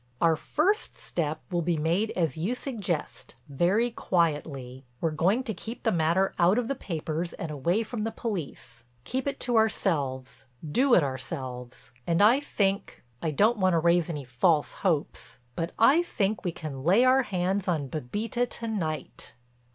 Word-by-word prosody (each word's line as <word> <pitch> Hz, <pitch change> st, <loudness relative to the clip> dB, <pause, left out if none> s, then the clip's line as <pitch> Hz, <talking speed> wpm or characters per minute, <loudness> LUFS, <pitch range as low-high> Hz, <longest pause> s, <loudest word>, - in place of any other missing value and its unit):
Our 165 Hz, -1 st, +4 dB
first 365 Hz, -, 0 dB
step 155 Hz, -2 st, -1 dB
will 175 Hz, -1 st, +1 dB
be 170 Hz, 0 st, 0 dB
made 170 Hz, +8 st, +1 dB
as 165 Hz, -7 st, 0 dB
you 185 Hz, +10 st, -1 dB
suggest, 205 Hz, -, -4 dB
very 185 Hz, -, +1 dB
quietly. 145 Hz, -, -1 dB, 0.2 s
We're 165 Hz, -, 0 dB
going 185 Hz, +11 st, +2 dB
to 230 Hz, -4 st, -3 dB
keep 225 Hz, +6 st, -8 dB
the 225 Hz, -, +2 dB
matter 170 Hz, +3 st, +2 dB
out 180 Hz, +5 st, +4 dB
of 245 Hz, -2 st, 0 dB
the 275 Hz, -, 0 dB
papers 165 Hz, -, -4 dB
and 165 Hz, -, -5 dB
away 170 Hz, +10 st, 0 dB
from 225 Hz, -1 st, -4 dB
the 225 Hz, -, -2 dB
police. 175 Hz, -, -6 dB, 0.2 s
Keep 260 Hz, -, -3 dB
it 280 Hz, -, -2 dB
to 240 Hz, -2 st, +1 dB
ourselves—do 150 Hz, -, 0 dB
it 170 Hz, -, +5 dB
ourselves. 130 Hz, -2 st, -6 dB, 0.2 s
And 170 Hz, -1 st, +2 dB
I 220 Hz, +6 st, +6 dB
think—I 195 Hz, -, -2 dB
don't 210 Hz, +10 st, +3 dB
want 185 Hz, -1 st, +3 dB
to -, -, +3 dB
raise 170 Hz, +1 st, +3 dB
any 150 Hz, -5 st, -4 dB
false 145 Hz, +5 st, +2 dB
hopes—but 155 Hz, -3 st, -3 dB
I 275 Hz, +9 st, +6 dB
think 215 Hz, -, -1 dB
we 180 Hz, -, -1 dB
can 150 Hz, -4 st, -7 dB
lay 195 Hz, -, +5 dB
our 260 Hz, +1 st, +5 dB
hands 190 Hz, -2 st, -1 dB
on 155 Hz, -6 st, 0 dB
Bébita 210 Hz, -, -2 dB
to 230 Hz, -, -5 dB
night." 160 Hz, -, -4 dB
175 Hz, 160 wpm, -27 LUFS, 150-220 Hz, 0.2 s, I